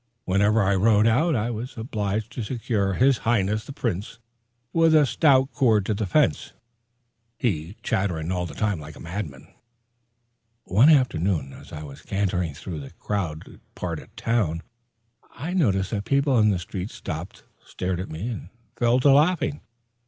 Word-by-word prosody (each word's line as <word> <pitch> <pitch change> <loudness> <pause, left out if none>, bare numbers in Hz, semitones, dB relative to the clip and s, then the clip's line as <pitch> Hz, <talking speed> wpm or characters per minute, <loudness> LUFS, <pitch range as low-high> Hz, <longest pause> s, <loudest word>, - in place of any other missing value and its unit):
Whenever 100 +3 +3
I 100 +1 +2
rode 105 +2 +4
out, 150 +8 +3
I 115 +1 0
was 120 +3 -6
obliged 110 -1 -2
to - - -5
secure 105 -3 -1
his 130 +3 +3
Highness 110 -1 +1
the - - -8
Prince 110 -5 -3 0.6
with 165 -1 +4
a 150 -2 +6
stout 135 -1 +3
cord 110 -5 +3
to 110 - 0
the 105 0 -2
fence, 130 - +1 0.8
he 90 -5 -2
chattering 90 -7 -1
all 90 -1 -1
the 70 - -10
time 105 -5 0
like 75 0 -10
a - - -13
madman. 85 -6 -7 1.1
One 115 - +5
afternoon 95 - +2
as - - -13
I 75 - -7
was 70 -2 -10
cantering 90 -6 -1
through 80 +1 -6
the 70 -2 -8
crowded 90 -7 -4
part - - -4
of - - -14
the - - -34
town, 90 -8 0 0.7
I 170 +5 -4
noticed 100 - +1
that 110 - 0
the - - -2
people 140 -2 +3
in 105 0 +5
the 100 - +1
street 90 +2 -5
stopped, 80 -3 -7 0.2
stared 90 -1 -3
at 95 - -5
me, 80 +8 -5
and 110 -7 -6 0.3
fell 120 +1 +3
to 140 - +6
laughing. 150 0 +3
105 Hz, 170 wpm, -24 LUFS, 90-120 Hz, 1.1 s, a